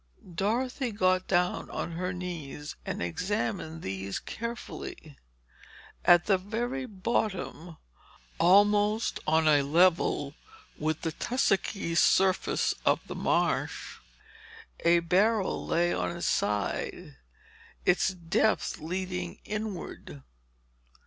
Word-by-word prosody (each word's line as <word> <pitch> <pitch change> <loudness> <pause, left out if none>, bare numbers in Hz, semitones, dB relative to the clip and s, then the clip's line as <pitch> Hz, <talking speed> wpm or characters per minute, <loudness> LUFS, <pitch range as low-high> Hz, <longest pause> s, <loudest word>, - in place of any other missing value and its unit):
Dorothy 240 +7 -1
got 185 -2 +2
down 180 -1 +1
on - - -4
her 180 +2 -2
knees 165 -5 -6
and - - -2
examined 180 - -2
these 95 +1 -4
carefully. 230 -9 -7 0.9
At 175 0 +6
the 195 -3 +3
very 240 +7 -3
bottom, 185 -5 -2 0.6
almost 205 +4 +4
on 160 0 +3
a 145 -2 +5
level 160 -1 +2 0.5
with 155 +1 -1
the 165 - -2
tussocky 195 - 0
surface 185 +2 +3
of - - +3
the - - -6
marsh, - - -1 0.8
a 170 0 +4
barrel 195 +5 +1
lay 175 +1 +2
on 170 - -2
its 170 - -3
side, 100 -8 -1 0.7
its - - +3
depth 185 +2 0
leading 160 - -4
inward. 200 - -6
180 Hz, 100 wpm, -29 LUFS, 160-205 Hz, 0.9 s, At